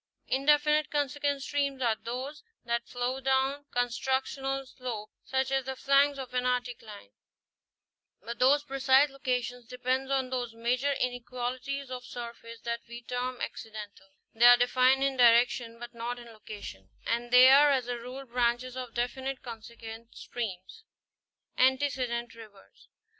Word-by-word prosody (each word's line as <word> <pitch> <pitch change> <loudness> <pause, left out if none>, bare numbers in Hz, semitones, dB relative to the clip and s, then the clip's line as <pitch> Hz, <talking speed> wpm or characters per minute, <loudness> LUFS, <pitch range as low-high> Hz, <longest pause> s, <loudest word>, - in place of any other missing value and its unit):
Indefinite 295 +2 +3
consequent 285 -1 -1
streams 280 -2 -1
are 235 -3 +2
those 255 +7 -6 0.2
that 235 0 -1
flow 245 +2 -2
down 270 +2 +1
constructional 265 +2 -1
slopes, 250 -5 -6
such 265 0 0
as 270 -1 +1
the 265 0 -4
flanks 275 +1 +3
of 260 -2 -7
an 250 0 0
anticline, 245 - -3 1.1
but 235 +4 -7
whose 285 +3 +5
precise 275 0 +3
location 250 -2 -2
depends 255 +1 -1
on 265 -2 0
those 245 -3 -3
minor 250 +5 0
inequalities 250 +2 -3
of 250 -1 -5
surface 235 -1 -8
that 235 0 -3
we 235 0 -9
term 250 +1 -3
accidental; 210 -3 -7 0.3
they 230 +2 +4
are 245 0 +10
defined 255 +2 +3
in 275 -1 0
direction 240 -1 +4
but 240 0 -9
not 235 +1 -4
in 240 -1 -11
location; 205 - -10 0.2
and 235 +1 -1
they 250 +2 +8
are 290 +2 +7
as 260 -4 +1
a 245 - -2
rule 250 +3 -8
branches 245 +1 0
of 250 -3 -6
definite 260 +2 -3
consequent 230 -1 -10
streams. 220 - -6 0.8
i - - +4
Antecedent 255 -3 -1
rivers. 215 -3 -16
250 Hz, 140 wpm, -29 LUFS, 235-270 Hz, 1.1 s, are